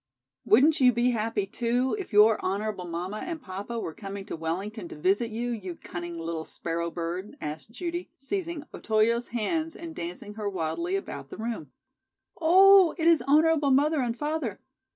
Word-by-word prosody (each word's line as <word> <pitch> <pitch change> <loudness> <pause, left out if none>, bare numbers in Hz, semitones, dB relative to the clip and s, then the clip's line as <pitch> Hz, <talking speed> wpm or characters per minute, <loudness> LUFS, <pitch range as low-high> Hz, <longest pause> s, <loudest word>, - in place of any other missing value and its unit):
"Wouldn't 285 +7 +5
you 250 -1 +7
be 240 +1 +2
happy, 220 -3 -1
too, 240 - 0
if 380 - -6
your 210 +1 +5
honorable 200 0 -2
mamma 175 +5 -4
and 340 -2 -4
papa 205 +1 -5
were 165 - -4
coming 195 +1 -7
to - - -5
Wellington 180 +5 -4
to - - -9
visit 195 +9 +1
you, 235 +2 -3
you 190 -7 -5
cunning 175 0 -7
little 165 -1 -3
sparrow 170 +1 -3
bird?" 175 +4 -5
asked 150 +6 -6
Judy, 345 +8 -4
seizing 335 +2 -4
Otoyo's 230 +2 +1
hands 315 +8 -2
and 335 -1 -8
dancing 180 +4 -6
her 210 -1 -3
wildly 200 - -2
about 390 - -5
the - - -8
room. 220 - -4 0.7
"Oh, 380 +2 +7
it 325 -1 +1
is 335 -2 +6
honorable 305 0 +4
mother 290 +3 +3
and 240 -1 -2
father! 310 +3 -2
225 Hz, 170 wpm, -27 LUFS, 185-300 Hz, 0.7 s, you